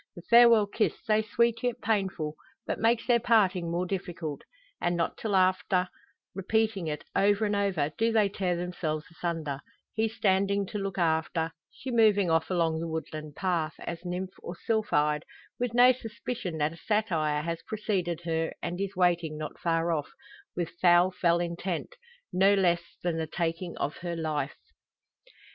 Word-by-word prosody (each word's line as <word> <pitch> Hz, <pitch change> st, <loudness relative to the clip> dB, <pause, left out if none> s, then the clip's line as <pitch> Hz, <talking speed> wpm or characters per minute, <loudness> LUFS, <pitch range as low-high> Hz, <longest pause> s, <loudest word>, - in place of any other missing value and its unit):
The 175 Hz, -, -10 dB
farewell 235 Hz, -2 st, +7 dB
kiss, 215 Hz, +2 st, 0 dB
so 215 Hz, -1 st, +3 dB
sweet 230 Hz, +1 st, +1 dB
yet 245 Hz, -2 st, -1 dB
painful, 190 Hz, -8 st, -1 dB, 0.3 s
but -, -, -3 dB
makes 230 Hz, +1 st, +2 dB
their 240 Hz, -2 st, +4 dB
parting 200 Hz, -7 st, +3 dB
more 175 Hz, +2 st, -1 dB
difficult; 175 Hz, -5 st, -4 dB, 0.4 s
and, 175 Hz, 0 st, +1 dB
not 170 Hz, -, 0 dB
till 210 Hz, -3 st, -2 dB
after 185 Hz, 0 st, +2 dB, 0.4 s
repeating 200 Hz, -1 st, 0 dB
it 150 Hz, -1 st, -3 dB
over 205 Hz, +2 st, +3 dB
and 205 Hz, 0 st, 0 dB
over, 185 Hz, -8 st, 0 dB
do 225 Hz, +1 st, +3 dB
they 215 Hz, -2 st, +4 dB
tear 190 Hz, -2 st, -1 dB
themselves 170 Hz, -3 st, -3 dB
asunder 165 Hz, -5 st, -3 dB, 0.3 s
he 220 Hz, +1 st, +1 dB
standing 200 Hz, -1 st, +1 dB
to 210 Hz, -, -5 dB
look 195 Hz, 0 st, -4 dB
after, 160 Hz, -1 st, +1 dB, 0.2 s
she 260 Hz, -, -7 dB
moving 210 Hz, -6 st, +4 dB
off 160 Hz, 0 st, +2 dB
along 165 Hz, -3 st, +1 dB
the 165 Hz, -, -3 dB
woodland 155 Hz, -2 st, -5 dB
path, 170 Hz, -5 st, -1 dB
as 170 Hz, 0 st, -6 dB
nymph 180 Hz, +1 st, -4 dB
or 175 Hz, -, -6 dB
sylphide, 150 Hz, -10 st, +1 dB, 0.4 s
with 240 Hz, -1 st, -1 dB
no 250 Hz, +1 st, +8 dB
suspicion 225 Hz, -6 st, -5 dB
that 150 Hz, +1 st, 0 dB
a -, -, -12 dB
satyr 165 Hz, -9 st, 0 dB
has 165 Hz, 0 st, -3 dB
preceded 190 Hz, -6 st, -2 dB
her 165 Hz, -1 st, -1 dB
and 175 Hz, +2 st, -4 dB
is 200 Hz, 0 st, -3 dB
waiting 175 Hz, -4 st, +1 dB
not 155 Hz, -1 st, -6 dB
far 165 Hz, 0 st, +1 dB
off, 150 Hz, -3 st, -1 dB, 0.5 s
with 175 Hz, -2 st, -2 dB
foul 175 Hz, +1 st, +6 dB
fell 170 Hz, -1 st, +2 dB
intent 175 Hz, -, -3 dB, 0.4 s
no 195 Hz, +2 st, +5 dB
less 175 Hz, -3 st, +3 dB, 0.2 s
than 175 Hz, -2 st, 0 dB
the 160 Hz, -, -2 dB
taking 170 Hz, +2 st, -3 dB
of 145 Hz, -, -2 dB
her 170 Hz, -1 st, -4 dB
life. 155 Hz, -3 st, -2 dB
180 Hz, 165 wpm, -28 LUFS, 165-205 Hz, 0.5 s, no